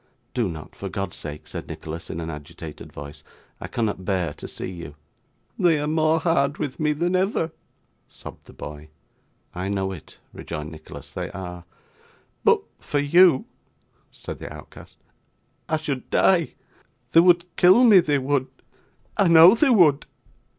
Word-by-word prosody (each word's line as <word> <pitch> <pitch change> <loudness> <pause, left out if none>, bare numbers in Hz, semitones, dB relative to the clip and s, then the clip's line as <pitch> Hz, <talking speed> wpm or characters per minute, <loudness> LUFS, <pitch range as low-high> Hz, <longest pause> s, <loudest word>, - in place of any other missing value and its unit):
'Do 115 -6 0
not 80 -2 -9
for 100 - -6
God's 95 0 -4
sake,' 75 -1 -7
said - - -7
Nicholas, 80 +1 -7
in 85 - -5
an 80 0 -4
agitated 75 -2 -10
voice; 75 +2 -10 0.4
'I - - -6
cannot 105 -5 -2
bear 90 -5 -1
to - - -9
see - - -6
you.' 85 -5 -9 0.6
'They 165 -4 +3
are 145 - -2
more 155 +1 +2
hard 150 -4 +1
with 130 - -4
me 150 -1 +2
than 170 +5 0
ever,' 185 -3 0 0.6
sobbed - - -12
the - - -14
boy. 75 +1 -9 0.6
'I 90 +2 -4
know 95 -1 -1
it,' 90 -5 -11 0.2
rejoined 75 +1 -6
Nicholas. 80 -1 -11
'They - - -5
are.' 90 -2 -7 0.8
'But - - +4 0.2
for 145 - -3
you,' 150 0 +5 0.7
said - - -9
the - - -8
outcast, - - -13 0.7
'I 160 - +2
should 145 -4 -4
die. 175 -4 +2 0.6
They 165 - +7
would 175 0 +3
kill 185 +8 +6
me; 215 -6 +8
they 150 -4 +1
would; 135 0 0 0.7
I 200 - +4
know 165 +2 +9
they 270 +5 +3
would. 170 - +4
140 Hz, 155 wpm, -23 LUFS, -, 0.8 s, know